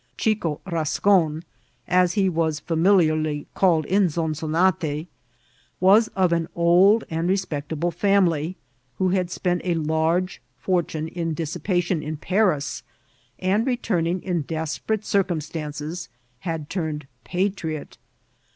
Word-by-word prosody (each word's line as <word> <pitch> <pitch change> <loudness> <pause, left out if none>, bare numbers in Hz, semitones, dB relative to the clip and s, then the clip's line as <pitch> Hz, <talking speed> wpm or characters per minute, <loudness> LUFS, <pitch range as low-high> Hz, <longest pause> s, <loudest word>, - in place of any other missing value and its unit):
Chico 205 -9 0
Bascon, 165 -1 +1 0.4
as 180 -1 +3
he 200 -3 +2
was 160 -3 0
familiarly 155 -3 +2
called 165 -5 +3
in 195 +3 +3
Zonzonate, 160 0 0 0.7
vras 205 +5 +5
of 185 -3 +3
an 165 -1 0
old 180 +6 +5
and 165 +2 -1
respectable 170 -3 -1
family, 185 -4 +1 0.4
who 185 - +1
had 180 -1 0
spent 180 -1 -1
a 175 -2 0
large 160 +3 0 0.2
fortune 160 +1 -1
in 165 -1 -3
dissipation 175 +1 -1
in 155 0 -4
Paris, 170 -6 0 0.6
and 200 +6 +1
returning 185 -8 0
in 175 -3 -1
desperate 160 +8 -3
circum 190 -5 +1
stances, 150 +2 -6 0.3
had 165 -3 -4
turned 155 -5 -3 0.2
patriot. 175 - -3
170 Hz, 115 wpm, -23 LUFS, 155-185 Hz, 0.7 s, vras